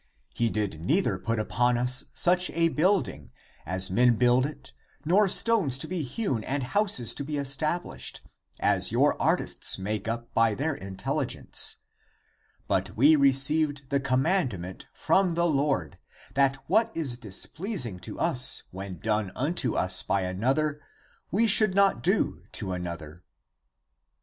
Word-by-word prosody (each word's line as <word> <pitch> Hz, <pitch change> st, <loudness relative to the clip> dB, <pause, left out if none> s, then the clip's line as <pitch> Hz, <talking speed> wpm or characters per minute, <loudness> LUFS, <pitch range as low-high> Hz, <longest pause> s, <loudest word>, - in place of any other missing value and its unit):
He 115 Hz, -1 st, 0 dB
did 105 Hz, -7 st, -3 dB
neither 180 Hz, -, 0 dB
put 115 Hz, 0 st, -2 dB
upon 120 Hz, +3 st, 0 dB
us 125 Hz, +2 st, +3 dB
such 180 Hz, +1 st, +4 dB
a 165 Hz, 0 st, +2 dB
building, 160 Hz, -, 0 dB, 0.4 s
as 95 Hz, +2 st, +1 dB
men 120 Hz, +4 st, +3 dB
build 125 Hz, +3 st, +3 dB
it, 150 Hz, -, -12 dB, 0.3 s
nor 195 Hz, +6 st, +3 dB
stones 195 Hz, -, +1 dB
to -, -, -1 dB
be 180 Hz, -2 st, -3 dB
hewn 135 Hz, -, -3 dB
and 135 Hz, +3 st, -3 dB
houses 185 Hz, -, +1 dB
to 140 Hz, -, -2 dB
be 150 Hz, +2 st, -7 dB
estab 145 Hz, +4 st, -1 dB
lished, -, -, -6 dB, 0.4 s
as -, -, +2 dB
your -, -, +2 dB
artists -, -, 0 dB
make 105 Hz, +2 st, -4 dB
up 115 Hz, +1 st, -5 dB
by 115 Hz, -2 st, +2 dB
their 150 Hz, +6 st, -1 dB
intelligence, 95 Hz, -6 st, -1 dB, 0.9 s
but -, -, -1 dB
we 145 Hz, +7 st, +6 dB
received 140 Hz, 0 st, +2 dB
the 140 Hz, -, +2 dB
commandment 130 Hz, -, -1 dB
from 190 Hz, -3 st, +1 dB
the 170 Hz, 0 st, +1 dB
Lord, 140 Hz, -, -1 dB, 0.3 s
that 135 Hz, -1 st, +2 dB
what 220 Hz, +5 st, +2 dB
is 140 Hz, -7 st, -2 dB
displeasing 120 Hz, -, -3 dB
to -, -, -7 dB
us 130 Hz, -6 st, +2 dB
when 95 Hz, -1 st, -7 dB
done 105 Hz, 0 st, -2 dB
unto 150 Hz, +7 st, -1 dB
us 90 Hz, 0 st, +3 dB
by 100 Hz, -, -1 dB
another, 135 Hz, +11 st, -1 dB, 0.5 s
we 210 Hz, +7 st, +2 dB
should 215 Hz, -3 st, +4 dB
not 195 Hz, -11 st, +3 dB
do -, -, 0 dB
to 95 Hz, -, -3 dB
another. 85 Hz, -2 st, -7 dB
135 Hz, 145 wpm, -26 LUFS, 110-165 Hz, 0.9 s, we